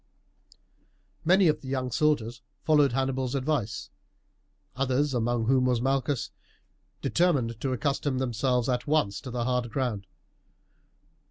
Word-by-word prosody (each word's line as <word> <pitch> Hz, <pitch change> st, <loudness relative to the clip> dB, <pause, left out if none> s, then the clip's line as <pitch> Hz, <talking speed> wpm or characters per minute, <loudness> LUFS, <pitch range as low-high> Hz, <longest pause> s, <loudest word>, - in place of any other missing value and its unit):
Many 185 Hz, +2 st, +5 dB
of 155 Hz, -, +1 dB
the 135 Hz, -, -10 dB
young 130 Hz, -1 st, -2 dB
soldiers 125 Hz, -5 st, 0 dB, 0.2 s
followed 150 Hz, -4 st, +4 dB
Hannibal's 130 Hz, 0 st, -1 dB
advice; 130 Hz, -7 st, -2 dB, 0.8 s
others, 135 Hz, +2 st, +1 dB
among 120 Hz, -1 st, 0 dB
whom 130 Hz, +1 st, +3 dB
was 125 Hz, -2 st, +2 dB
Malchus, 135 Hz, 0 st, -1 dB, 0.7 s
determined 130 Hz, -10 st, +1 dB
to 135 Hz, -, -1 dB
accustom 135 Hz, +1 st, -1 dB
themselves 125 Hz, -1 st, 0 dB
at 125 Hz, 0 st, -1 dB
once 145 Hz, -10 st, +1 dB
to 130 Hz, -, -8 dB
the 120 Hz, -1 st, -2 dB
hard 125 Hz, -1 st, 0 dB
ground. 110 Hz, -5 st, -2 dB
130 Hz, 120 wpm, -27 LUFS, 120-140 Hz, 0.8 s, Many